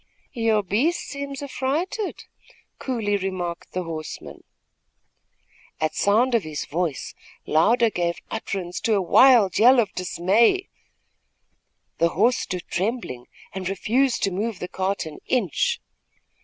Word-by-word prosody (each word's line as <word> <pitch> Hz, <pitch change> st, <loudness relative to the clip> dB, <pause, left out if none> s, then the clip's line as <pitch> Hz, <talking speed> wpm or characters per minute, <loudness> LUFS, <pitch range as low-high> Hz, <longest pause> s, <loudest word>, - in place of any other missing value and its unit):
"Your 225 Hz, -3 st, +1 dB
beast 245 Hz, -, +1 dB
seems 280 Hz, -1 st, -6 dB
affrighted," 310 Hz, +10 st, -2 dB, 0.6 s
coolly 220 Hz, -6 st, -1 dB
remarked 185 Hz, -3 st, -4 dB
the 185 Hz, -, -2 dB
horseman. 160 Hz, -2 st, -7 dB, 1.4 s
At 155 Hz, 0 st, 0 dB
sound 225 Hz, +9 st, +2 dB
of 230 Hz, -, +4 dB
his 155 Hz, -4 st, -5 dB
voice, 160 Hz, -3 st, -3 dB, 0.3 s
Louder 225 Hz, +8 st, +3 dB
gave 170 Hz, -2 st, -1 dB, 0.2 s
utterance 180 Hz, -3 st, -4 dB
to 220 Hz, -, +1 dB
a 200 Hz, -, +2 dB
wild 230 Hz, -1 st, +5 dB
yell 250 Hz, +3 st, +7 dB
of 215 Hz, -4 st, +1 dB
dismay. 200 Hz, -, +2 dB, 1.3 s
The 170 Hz, -, +4 dB
horse 225 Hz, +9 st, +2 dB
stood 180 Hz, -2 st, -4 dB
trembling 185 Hz, -, -3 dB, 0.3 s
and 190 Hz, -1 st, -3 dB
refused 240 Hz, +7 st, +1 dB
to 195 Hz, -, +2 dB
move 210 Hz, +3 st, -2 dB
the 180 Hz, -, -5 dB
cart 190 Hz, +1 st, -2 dB
an 155 Hz, -1 st, -9 dB
inch. 220 Hz, -, +1 dB
200 Hz, 125 wpm, -24 LUFS, 175-245 Hz, 1.4 s, yell